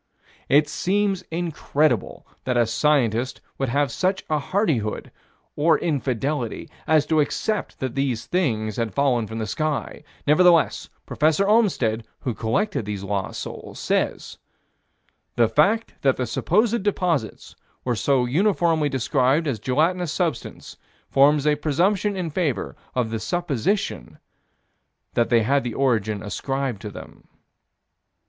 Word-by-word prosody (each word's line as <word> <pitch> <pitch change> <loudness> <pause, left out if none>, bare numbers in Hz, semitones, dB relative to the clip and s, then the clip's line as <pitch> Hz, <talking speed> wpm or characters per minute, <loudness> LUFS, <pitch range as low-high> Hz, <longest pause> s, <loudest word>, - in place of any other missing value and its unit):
It 150 +2 +5
seems 195 +4 0
incredible 155 - -1 0.2
that 125 -1 0
a 120 - +4
scientist 125 -1 +1 0.2
would 135 -2 0
have 140 +1 +1
such 190 +8 -1
hardihood, 150 - -1 0.4
or 155 +2 +3
infidelity, 135 -4 -2 0.2
as 155 -2 +4
to 160 0 +2
accept 205 +8 -1
that 130 -2 -3
these 135 -5 -1
things 110 - -1
had 115 -2 -2
fallen 125 -6 +2
from 110 - -6
the 110 - -2
sky: 150 +7 -3 0.2
nevertheless, 170 +2 +4 0.2
Prof. 155 +2 +1
Olmstead, 195 - +2 0.2
who 125 - -2
collected 135 - -1
these 100 -2 -4
lost 100 -1 -3
souls, - - -8
says: - - -2 1.0
"The 120 -1 +4
fact 200 - +2
that 135 -2 +2
the 125 - -1
supposed 215 - +1
deposits 180 - -1 0.3
were 125 -1 0
so 130 +2 +2
uniformly 165 - +2
described 135 +3 +1
as 135 -7 -2
gelatinous 165 +5 +1
substance 160 - -3 0.3
forms 145 +1 +4
a 150 - +4
presumption 185 +7 +1
in 175 -4 -3
favor 150 -6 -1 0.2
of 120 -3 0
the 110 - -2
supposition 175 - -2 1.0
that 120 -1 +1
they 115 -2 +4
had 140 +5 +2
the 120 -2 -4
origin 110 -6 0
ascribed 130 +1 -3
to 105 - -6
them." - - -12
140 Hz, 130 wpm, -23 LUFS, 120-170 Hz, 1.0 s, It